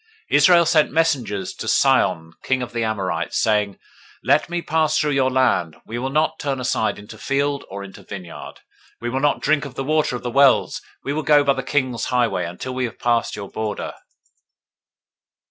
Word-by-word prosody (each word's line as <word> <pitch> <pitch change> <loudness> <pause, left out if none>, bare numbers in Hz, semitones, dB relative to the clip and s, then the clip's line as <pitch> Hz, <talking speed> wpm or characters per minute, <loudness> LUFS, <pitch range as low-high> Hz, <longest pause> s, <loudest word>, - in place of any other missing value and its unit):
021:021 - - +5
Israel 170 +3 +6
sent 160 -2 +3
messengers 125 - 0
to - - -7
Sihon 80 0 +2
king 130 -1 0
of 120 - -8
the 115 -1 -1
Amorites, 95 -6 -2
saying, 105 -2 +1
021:022 - - -38 0.4
Let - - +2
me 175 0 -2
pass 160 -1 +1
through 150 - +1
your 135 -2 +2
land: 120 -11 +1
we 120 +2 -5
will 130 +2 -2
not 155 +3 0
turn 140 -2 -2
aside 125 -3 0
into 105 +1 -12
field, 140 +2 -1
or 100 +1 -6
into 95 -1 -11
vineyard; 90 -4 -9 0.4
we 120 0 -4
will 130 - -1
not 145 +1 +1
drink 150 0 +2
of 140 -3 -8
the 135 - -3
water 155 -2 +1
of 120 - -6
the 120 - -3
wells: 135 0 +3 0.2
we 140 - -2
will 155 - -1
go 150 -1 +4
by 140 -1 +3
the 135 - -3
king's 130 -3 -1
highway, 115 -8 0
until 90 +9 -6
we 130 0 -1
have 120 - -7
passed 120 -1 0
your 100 -2 -7
border. 110 -2 -4
130 Hz, 195 wpm, -21 LUFS, 105-145 Hz, 0.4 s, Israel